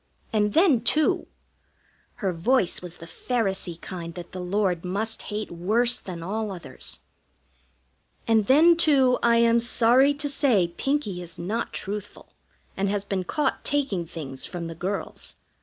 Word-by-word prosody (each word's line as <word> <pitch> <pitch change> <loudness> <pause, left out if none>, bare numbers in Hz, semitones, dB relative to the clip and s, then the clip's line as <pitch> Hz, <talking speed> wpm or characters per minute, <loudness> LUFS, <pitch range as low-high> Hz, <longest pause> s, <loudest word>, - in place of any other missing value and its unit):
And 210 -1 +2
then, 320 - +5
too" 305 +4 +2 1.0
her 185 - +1
voice 185 +4 +1
was 175 -1 -9
the 165 - -10
Pharisee 190 -5 -2
kind 170 -3 -7
that 175 -1 -8
the 185 - -7
Lord 180 -1 0
must 205 +5 -3
hate 210 0 -4
worse 220 +8 +2
than 175 -3 -7
all 210 +3 -3
others 155 -9 -7 1.3
"and 220 -3 +3
then, 325 +6 +6
too, 275 -6 +4
I 235 0 +4
am 235 0 +4
sorry 245 +4 +4
to 290 0 -2
say 260 - +2
Pinkie 270 -11 -1
is 170 -1 -8
not 210 +7 -3
truthful, 205 0 -6 0.4
and 195 0 0
has 200 0 -1
been 190 -2 -2
caught 300 - -1
taking 265 -13 -1
things 135 -5 -7
from 175 -3 -5
the 165 - -5
girls. 185 +5 -3
205 Hz, 150 wpm, -25 LUFS, 180-245 Hz, 1.3 s, then